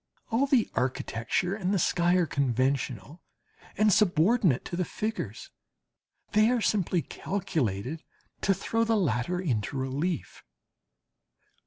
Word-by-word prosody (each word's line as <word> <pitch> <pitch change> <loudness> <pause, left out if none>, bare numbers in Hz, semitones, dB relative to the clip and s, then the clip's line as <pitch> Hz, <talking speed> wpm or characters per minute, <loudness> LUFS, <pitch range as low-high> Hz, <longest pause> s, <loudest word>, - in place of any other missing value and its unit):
All 250 +5 +2
the 260 -5 +3
architecture 130 +7 -1
and 195 -2 -2
the 200 - +2
sky 175 +1 +2
are 180 -2 +3
conventional 135 - -1 0.6
and 215 0 +4
subordinate 180 - +3
to - - -4
the 180 - 0
figures, 210 - -5 0.8
they 215 +2 +4
are 250 -1 +2
simply 185 -6 +1
calculated 155 - -3 0.4
to 195 - +2
throw 225 +4 0
the 225 -1 +2
latter 170 - 0
into 130 - -2
relief. 140 +6 -3
175 Hz, 120 wpm, -28 LUFS, 130-205 Hz, 0.8 s, and